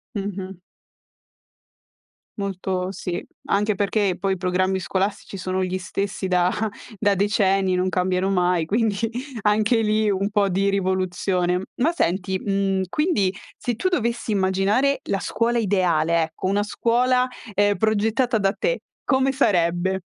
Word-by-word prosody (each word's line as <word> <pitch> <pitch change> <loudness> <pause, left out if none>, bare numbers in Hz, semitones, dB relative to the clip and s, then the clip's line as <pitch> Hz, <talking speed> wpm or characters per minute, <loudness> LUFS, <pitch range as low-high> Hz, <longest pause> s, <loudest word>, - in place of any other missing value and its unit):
Mh-mh. 195 -2 -5 1.8
Molto 190 -1 -2
sì. 180 -2 -4 0.3
Anche 210 0 +2
perché 200 -2 +1
poi 195 +1 0
i - - -4
programmi 185 +1 0
scolastici 195 +2 -2
sono 185 0 -1
gli 185 0 -1
stessi 195 +1 -3
da 180 -1 +3 0.5
da 205 0 +2
decenni, 195 -2 +2
non 185 +1 +1
cambiano 185 +1 0
mai, 180 -3 +2
quindi 215 +1 +1 0.4
anche 215 +2 +3
lì 215 0 +2
un 200 +1 0
po' 205 -1 +2
di 195 +2 +1
rivoluzione. 185 -1 0
Ma 300 +7 +2
senti, 190 - -1
mhmm, 195 -1 0
quindi 295 - +1 0.2
se 240 -2 -2
tu 370 +11 0
dovessi 235 -8 -1
immaginare 200 +8 +2
la 195 - +1
scuola 235 +5 0
ideale, 170 -6 +2
ecco, 160 +4 -4
una 205 +2 +1
scuola, 250 +4 +2 0.3
ehm, 205 +1 +3
progettata 220 +3 +1
da 195 0 +1
te, - - -1 0.2
come 265 0 +2
sarebbe? 185 -5 +1
195 Hz, 135 wpm, -23 LUFS, 185-215 Hz, 1.8 s, da